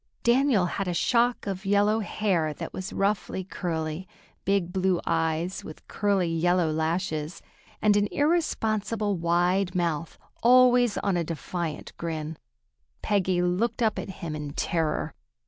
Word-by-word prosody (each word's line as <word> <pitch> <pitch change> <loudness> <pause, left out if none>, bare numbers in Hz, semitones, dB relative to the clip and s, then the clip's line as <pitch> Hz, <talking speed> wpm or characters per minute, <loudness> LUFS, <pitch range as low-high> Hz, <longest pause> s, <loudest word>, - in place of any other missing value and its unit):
Daniel 240 -5 +4
had 190 +2 -3
a 175 - -1
shock 240 +6 +2
of 195 -1 -4
yellow 205 +2 +3
hair 185 -8 0
that - - -6
was 185 - -5
roughly 195 -1 -1
curly, 165 -1 -4 0.4
big 195 -3 +1
blue 185 -2 +1
eyes 165 +3 -1
with 155 - -11
curly 200 -3 +1
yellow 165 0 +2
lashes, 160 0 -2 0.4
and 210 -1 +5
an 205 0 +3
irresponsible 220 - 0
wide 175 +2 +1
mouth, 165 -3 -1 0.2
always 245 -2 +5
on 195 -3 0
a 170 - +1
defiant 165 +1 -5
grin. 160 -1 -4 0.7
Peggy 185 -3 +1
looked 200 +7 0
up 220 -2 +1
at - - -6
him 170 -4 -5
in 150 -1 -5
terror. 160 -1 -1
185 Hz, 135 wpm, -27 LUFS, 165-205 Hz, 0.7 s, and